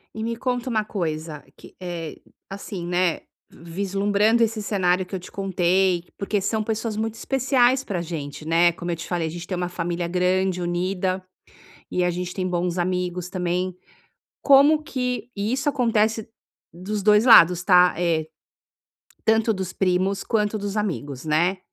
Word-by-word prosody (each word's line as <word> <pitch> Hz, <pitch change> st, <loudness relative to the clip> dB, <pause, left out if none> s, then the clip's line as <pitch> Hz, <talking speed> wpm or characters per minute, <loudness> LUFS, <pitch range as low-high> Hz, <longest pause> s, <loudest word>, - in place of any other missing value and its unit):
E 220 Hz, -, -4 dB
me 230 Hz, +1 st, -2 dB
conta 250 Hz, +1 st, -2 dB
uma 215 Hz, -3 st, 0 dB
coisa 155 Hz, -6 st, -4 dB
que, -, -, -16 dB
eh, 170 Hz, -3 st, -5 dB, 0.3 s
assim, 195 Hz, -2 st, -6 dB
né, 175 Hz, -1 st, +1 dB, 0.3 s
vislumbrando 200 Hz, +6 st, 0 dB
esse 225 Hz, -1 st, -1 dB
cenário 185 Hz, -3 st, +1 dB
que 190 Hz, -, -7 dB
eu -, -, -3 dB
te 180 Hz, -, -12 dB
contei, 185 Hz, -2 st, +1 dB
porque 200 Hz, 0 st, -1 dB
são 215 Hz, +2 st, -1 dB
pessoas 220 Hz, 0 st, -3 dB
muito 220 Hz, 0 st, -2 dB
especiais 260 Hz, 0 st, +2 dB
pra 190 Hz, -8 st, -3 dB
gente, 155 Hz, -3 st, -6 dB
né, 170 Hz, +2 st, +4 dB
como 175 Hz, +1 st, -5 dB
eu -, -, -1 dB
te 165 Hz, -, -8 dB
falei, 175 Hz, -3 st, -1 dB
a -, -, -5 dB
gente 175 Hz, +1 st, -8 dB
tem 185 Hz, -, -3 dB
uma 180 Hz, 0 st, -2 dB
família 175 Hz, 0 st, -3 dB
grande, 180 Hz, +1 st, 0 dB
unida 185 Hz, +2 st, -1 dB, 0.7 s
e 180 Hz, -, 0 dB
a 180 Hz, -, +2 dB
gente 180 Hz, +1 st, -4 dB
tem 185 Hz, -1 st, -2 dB
bons 175 Hz, 0 st, -1 dB
amigos 180 Hz, 0 st, -2 dB
também. 180 Hz, 0 st, -2 dB, 0.7 s
Como 285 Hz, +2 st, +6 dB
que 250 Hz, -4 st, -3 dB
e 205 Hz, +2 st, -2 dB
isso 275 Hz, +2 st, 0 dB
acontece 225 Hz, -5 st, +1 dB, 0.5 s
dos 195 Hz, +4 st, -4 dB
2 210 Hz, +2 st, +5 dB
lados, 180 Hz, -7 st, +7 dB
tá, 180 Hz, -1 st, +5 dB
eh, 165 Hz, -3 st, 0 dB, 1.0 s
tanto 225 Hz, 0 st, +3 dB
dos 190 Hz, -2 st, -4 dB
primos 190 Hz, +1 st, 0 dB
quanto 215 Hz, -1 st, 0 dB
dos 205 Hz, 0 st, -4 dB
amigos, 145 Hz, -11 st, -3 dB
né. 170 Hz, +5 st, +1 dB
185 Hz, 165 wpm, -23 LUFS, 175-215 Hz, 1.0 s, lados